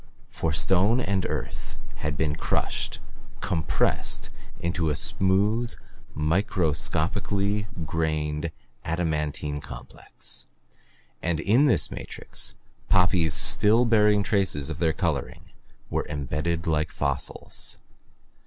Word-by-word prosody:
For 80 - -1
stone 95 - +3
and 100 -6 0
earth - - -4 0.2
had 75 -2 -2
been 75 -2 +1
crushed, - - -1 0.4
compressed, 80 -4 0 0.3
into 85 -2 0
a 75 - +1
smooth, 105 +9 +2 0.4
microscopically 95 +5 +1 0.2
grained, 75 -1 -1 0.3
adamantine 75 -3 -1
complex, - - -6 0.7
and 85 -2 0
in 115 - +4
this 130 - +3
matrix - - -3 0.3
poppies 90 -4 +4
still 110 +4 +5
bearing 105 -3 +4
traces 95 -10 +1
of - - -5
their 80 -2 +3
coloring 80 -7 -2 0.4
were - - -1
imbedded 75 +3 -2
like 75 -2 +1
fossils. 70 -2 -3
85 Hz, 95 wpm, -26 LUFS, 75-100 Hz, 0.7 s, still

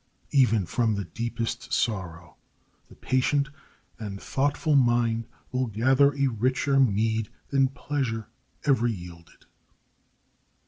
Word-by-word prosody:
Even 115 -8 +4
from 110 +3 0
the 100 - -2
deepest 115 +6 -4
sorrow 90 -8 -2 0.5
the - - -15
patient 135 +2 +1 0.5
and 100 -3 -6
thoughtful 145 +5 0
mind 120 -3 +2 0.2
will 130 0 0
gather 130 +6 +3
a 140 -1 +1
richer 130 +3 +1
mead 110 -2 +2 0.2
than 135 -1 +3
pleasure 130 -5 -3 0.4
ever 130 -5 +3
yielded. 85 -6 -8
120 Hz, 105 wpm, -26 LUFS, 110-135 Hz, 0.5 s, Even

